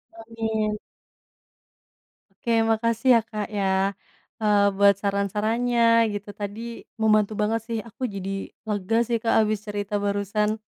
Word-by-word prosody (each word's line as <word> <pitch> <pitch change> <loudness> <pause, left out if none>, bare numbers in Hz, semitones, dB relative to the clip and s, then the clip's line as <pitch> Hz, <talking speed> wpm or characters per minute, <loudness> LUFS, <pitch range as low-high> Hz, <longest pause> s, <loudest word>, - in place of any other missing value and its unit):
Amin. 220 -2 -2 1.5
Oke 235 +4 -4 0.2
makasih 230 +2 0
ya - - +6
Kaka 215 -1 -7 0.2
ya, 200 - +1 0.8
eee, 205 -1 +4
buat 200 0 +5
saran-sarannya 210 +4 0 0.3
gitu 205 0 -6
tadi, 205 +1 -5 0.4
membantu 215 -1 +3
banget 225 +1 +1
sih 230 -1 -2
aku 230 - -9
jadi, 195 0 -4 0.4
lega 210 +1 0
sih 235 - +1
Kak 225 - +2
habis 215 -1 0
cerita 205 0 -4
barusan. 205 +2 0
215 Hz, 125 wpm, -24 LUFS, 205-225 Hz, 1.5 s, ya